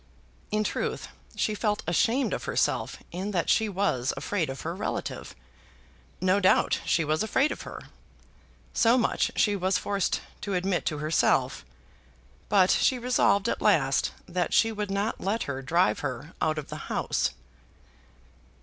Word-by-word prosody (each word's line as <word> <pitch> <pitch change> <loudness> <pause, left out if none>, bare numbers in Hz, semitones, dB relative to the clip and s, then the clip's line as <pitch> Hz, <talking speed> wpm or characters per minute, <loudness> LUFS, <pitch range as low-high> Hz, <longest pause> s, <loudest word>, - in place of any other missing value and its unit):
In 215 0 +1
truth, - - -3 0.3
she 215 - 0
felt 210 0 -1
ashamed 225 - +1
of - - -4
herself - - 0
in 185 +4 -4
that 180 -5 +1
she 220 -1 +2
was 185 -11 0
afraid 165 +3 -1
of 135 - -6
her 170 +2 -4
relative. 210 - -4 0.8
No 185 +2 +3
doubt 185 -1 +3
she 165 - +2
was 155 +1 0
afraid 265 +7 +2
of - - -5
her. - - -8 0.9
So 235 +1 +4
much 240 - +1
she 205 -1 +3
was 190 0 +1
forced 200 -2 -1 0.2
to 200 -2 -2
admit 180 0 0
to 150 - -1
herself. 155 +1 +1 0.9
But 190 -2 +5
she 260 - +3
resolved 235 -4 +2
at - - -1
last - - +3 0.2
that 180 -1 -1
she 225 - +4
would 210 -2 -4
not 200 +3 -2
let 215 +4 0
her 135 -1 -4
drive 135 -7 +2
her 130 +6 -5
out 155 0 +1
of 150 - -5
the - - -5
house. - - 0
195 Hz, 155 wpm, -27 LUFS, 165-210 Hz, 0.9 s, But